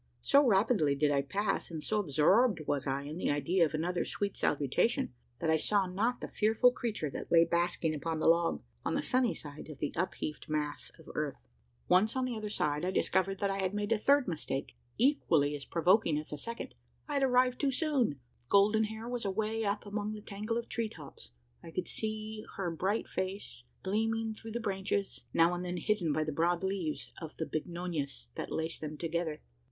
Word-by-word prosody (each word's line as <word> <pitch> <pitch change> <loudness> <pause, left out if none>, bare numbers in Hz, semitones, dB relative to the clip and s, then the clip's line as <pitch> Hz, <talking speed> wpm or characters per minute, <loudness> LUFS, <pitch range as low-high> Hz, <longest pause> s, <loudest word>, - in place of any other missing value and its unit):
So 280 +1 +6
rapidly 195 - +3
did 145 +1 +2
I 140 -1 +3
pass, 200 +9 -1
and 160 -3 -5
so 215 - 0
absorbed 185 - +3
was 140 -1 -1
I 135 +1 -1
in 150 +3 -6
the - - 0
idea 145 +6 +2
of 155 - -3
another 175 +3 0
sweet 200 -1 -2
salutation, 150 - +1 0.2
that 160 - 0
I 160 - +5
saw 200 +5 +2
not 210 +7 -1
the - - -4
fearful 220 +4 +4
creature 215 - -3
that - - -6
lay 165 0 +7
basking 170 -1 +1
upon 160 +2 -2
the 155 - -1
log 170 0 +3 0.2
on - - 0
the - - 0
sunny 250 -2 +2
side 145 +1 -8
of 150 - -8
the 145 - -2
upheaved 165 -4 -3
mass 150 -1 -2
of - - -17
earth. - - -3 0.4
Once 210 +6 +4
on 260 -1 +1
the 250 -2 -2
other 215 -1 -4
side, 150 -6 0
I 180 - +1
discovered 190 0 +1
that 200 -1 +2
I 195 - -2
had 190 +1 -1
made 210 +1 -2
a 225 - +3
third 280 +4 +4
mistake 150 -5 -3 0.2
equally 165 - +3
as 140 - -7
provoking 170 -1 +3
as 150 - -5
the 150 - -3
second 235 +6 -5 0.3
I 295 - -4
had 280 - +2
arrived 250 -1 +3
too 280 - +3
soon! 265 - +1 0.3
Golden 210 +2 +5
hair 220 +2 -6
was 245 -1 -3
away 215 +3 -1
up 205 0 -1
among 205 +1 -3
the 210 - -7
tangle 215 +3 -3
of 235 - -1
the - - -25
tree 230 -2 -1
tops. 140 - -12 0.3
I - - -10
could 180 +2 -3
see 215 0 -3
her 185 -3 -1
bright 190 +7 -1
face 185 -9 -4 0.2
gleaming 225 +3 0
through 225 0 -9
the 235 - -1
branches 195 -2 -2
now 165 +1 +4
and 175 0 -3
then 180 0 -3
hidden 185 -4 +1
by 155 +1 +1
the 155 - -2
broad 170 +4 +1
leaves 190 -5 -2
of 160 -2 -8
the 160 - -2
bignonias 155 - -4
that - - -5
laced 160 +1 -2
them 155 -1 -5
together. 165 -1 -2
190 Hz, 205 wpm, -32 LUFS, 155-220 Hz, 0.4 s, lay